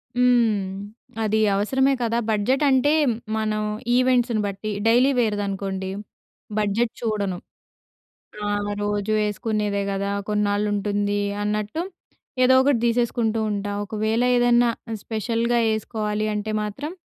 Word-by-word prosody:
హ్మ్. 235 -5 +3 0.6
అది 215 0 +1 0.2
అవసరమే 265 +7 +2
కదా! 230 0 0
బడ్జెట్ 220 +7 +1
అంటే 265 +2 +3 0.5
మనం 215 -1 -1 0.4
ఈవెంట్స్‌ని 245 -3 +2
బట్టి. 200 +2 -4 0.2
డైలీ 250 +4 +5
వేర్‌దనుకోండి 200 -3 -2 0.7
బడ్జెట్ 215 +3 0
చూడను. 205 -5 -1 1.1
ఆ! - - 0 0.3
రోజు 205 +1 -1
వేసుకునేదే 210 -1 -1
కదా! 200 +1 -2 0.2
కొన్నాళ్ళు 210 0 +1
ఉంటుంది 205 0 0 0.2
అన్నట్టు, 210 +8 -2 0.6
ఏదోకటి 260 0 +4
తీసేసుకుంటూ 230 -1 +1
ఉంటా. 205 0 -3
ఒకవేళ 220 +2 -1 0.2
ఏదన్నా 240 0 +4 0.3
స్పెషల్‌గా 230 +2 0
ఏసుకోవాలి 215 -1 -2
అంటే 215 +1 -3
మాత్రం, 280 - -5
215 Hz, 100 wpm, -23 LUFS, 205-240 Hz, 1.1 s, డైలీ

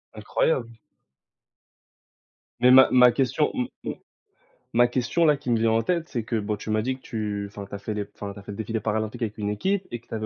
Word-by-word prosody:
Incroyable. 115 +2 -1 1.8
Mais 125 +1 +6
ma 130 +1 +8
ma 125 -1 +7
question 135 +4 +1
m 125 - -1 0.2
m - - -3 0.8
ma 120 +1 +5
question, 125 +7 +1
là, 150 -2 +4
qui 130 -4 -4
me 115 - +3
vient 115 - +3
en 115 0 +2
tête, 170 +3 -1
c'est 120 -4 -3
que 115 0 -1
boh, 105 0 -2
tu 110 - -5
m'as 110 0 +2
dit 130 +3 -1
que 130 - -18
tu 105 -2 -3
enfin, 100 0 -9
que - - -19
tu - - -6
as - - -6
fait 110 - -4
les 105 -1 -3
enfin, 100 -1 -6
tu 100 - -11
as - - -13
fait 100 - -8
le 100 - -8
défilé 110 +1 -2
paralympique 110 +2 -2
avec 110 -2 -3
une 105 -1 -2
équipe 190 - -1
et 120 - -4
que 115 - -30
tu - - -10
avais 110 - -3
115 Hz, 250 wpm, -25 LUFS, 105-125 Hz, 1.8 s, ma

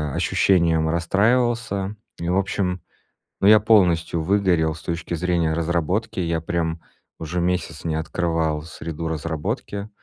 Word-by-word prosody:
ощущением 85 -4 +2
расстраивался. 105 +3 +1 0.2
И, 85 +1 -3
в 90 - +2
общем, 95 -2 -1 0.6
ну, 100 - +4
я 110 0 +8
полностью 90 -6 +3
выгорел 90 -4 +2
с 80 - -11
точки 85 0 -3
зрения 85 -2 0
разработки. 85 +7 -1
Я 85 -1 0
прям 80 -1 -2 0.4
уже 85 +2 -3
месяц 85 -3 -2
не 80 -1 0
открывал 80 -1 -1
среду 80 0 -6
разработки. 80 +6 -4
85 Hz, 125 wpm, -23 LUFS, 80-95 Hz, 0.6 s, я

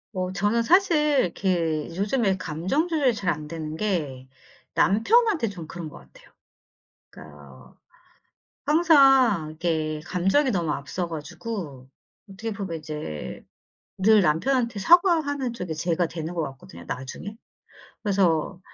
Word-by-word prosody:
어 185 0 -2
저는 205 +5 +1
사실 300 -1 +3
이렇게 170 -4 -1
요즘에 200 0 +1
감정 185 - -1
조절이 285 -8 +1
잘 180 -5 0
안되는 155 +1 -6
게 150 -11 -2 0.5
남편한테 340 - +3
좀 180 -5 -8
그런 170 -1 -7
것 - - -12
같아요. - - -18 0.8
그러니까 75 -1 -13 0.4
어 - - -28 0.9
항상 270 - +5
이렇게 155 -1 -2
감정이 195 +11 +2
너무 175 -9 0
앞서 170 +5 -3
가지고 155 - -7 0.4
어떻게 210 +3 -6
보면 195 -5 -5
이제 150 - -7 0.5
늘 210 +2 +5
남편한테 230 - +1
사과하는 305 - +3
쪽이 180 -8 -5
제가 170 +2 0
되는 165 +1 -6
것 170 - 0
같거든요 85 -10 -14
나중에. 135 +11 -6 0.7
그래서 185 -3 +1
190 Hz, 270 characters per minute, -25 LUFS, 160-240 Hz, 0.9 s, 항상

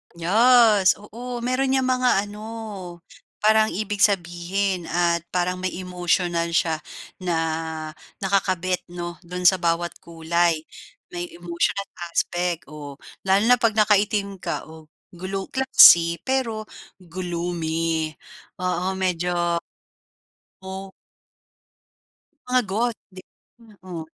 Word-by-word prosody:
Yes, 215 +2 +5
oo. 235 +4 -7
Meron 255 +2 0
niyang 265 - +2
mga 250 -5 +2
ano, 205 0 -9 1.0
parang 220 0 +5
ibig 205 0 -3
sabihin 180 -1 0
at 170 -1 0
parang 180 +1 -1
may 185 -1 -3
emotional 175 -1 -1
siya 160 -2 +1 0.4
na 175 -2 -1 0.9
nakakabit 185 -2 0
'no, 175 -1 -7
do'n 180 +1 -5
sa 185 +1 +5
bawat 170 0 0
kulay. 170 0 0 0.6
May 175 0 -4
emotional 175 +3 -1 0.2
aspect, 175 0 -1
oh. 145 -2 -8 0.3
Lalo 195 +2 +4
na 245 +1 +5
'pag 225 -2 +2
nakaitim 205 -2 +2
ka. 170 -2 -3
Oh, 160 -1 -14 0.2
glow 190 +2 -5
classy 260 -11 +7
pero 250 -5 -1 0.3
gloomy. 165 -3 -3 0.5
Oo, 180 +1 -1
medyo 175 -2 0 1.0
Oh. 190 0 -7 1.6
Mga 250 0 +3
Goth 230 +3 -1
di 185 -1 -12 0.6
oo, 175 -4 -7
180 Hz, 105 wpm, -23 LUFS, 170-205 Hz, 1.6 s, classy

